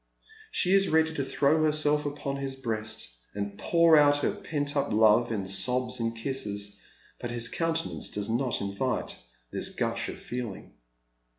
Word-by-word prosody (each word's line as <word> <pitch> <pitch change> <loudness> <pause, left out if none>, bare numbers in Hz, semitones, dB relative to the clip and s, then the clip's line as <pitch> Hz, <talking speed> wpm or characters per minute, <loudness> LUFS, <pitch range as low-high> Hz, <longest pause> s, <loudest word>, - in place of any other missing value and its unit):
She 185 - +1
is 195 -1 +4
ready 160 0 +3
to 140 - -1
throw 145 +3 +2
herself 150 -1 +2
upon 140 -1 -4
his 135 -1 -3
breast 110 -4 -4 0.3
and 100 0 -3
pour 165 +7 +4
out 145 -1 +6
her - - +2
pent 145 -1 -3
up 140 - 0
love 110 +2 +4
in 100 -4 -2
sobs 125 +6 +1
and 115 0 -2
kisses, 105 -5 -3 0.4
but 120 - -4
his 120 0 -2
countenance 165 +3 -1
does 105 -1 -2
not 120 +2 0
invite 100 +6 -2 0.3
this - - -1
gush - - -2
of - - -6
feeling. 120 -6 -6
130 Hz, 160 wpm, -28 LUFS, 110-150 Hz, 0.4 s, out